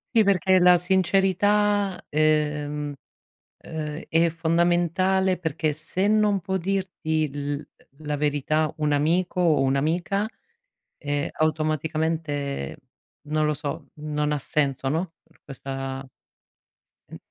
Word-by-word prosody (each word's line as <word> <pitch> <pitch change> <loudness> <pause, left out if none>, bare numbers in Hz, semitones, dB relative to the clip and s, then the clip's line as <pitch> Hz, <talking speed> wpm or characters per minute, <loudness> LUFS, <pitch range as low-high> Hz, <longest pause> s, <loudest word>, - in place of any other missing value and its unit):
Sì, 220 - +7
perché 190 -1 +3
la 180 0 +7
sincerità, 195 +2 +2
ehm, 150 -1 +1 0.7
uhm 155 -1 -5
è 165 +1 +3
fondamentale 175 +3 +2
perché 160 -2 -1
se 170 +6 -2
non 210 -1 +3
può 190 +3 -2
dirti 180 -4 -1
l 145 0 -4 0.3
la 150 -1 -2
verità 150 +1 0
un 150 -1 0
amico 170 +6 +1
o 160 -5 +3
un'amica, 165 +10 +1 0.7
ehm, 145 0 -2
automaticamente 155 - -1 0.5
non 155 0 +1
lo 150 - +2
so, 145 -1 -5
non 150 0 -2
ha 150 - 0
senso, 135 -1 -1
no, 165 +4 -2
per - - -29
questa 135 0 -5 1.0
mh - - -11
155 Hz, 110 wpm, -25 LUFS, 150-185 Hz, 1.0 s, Sì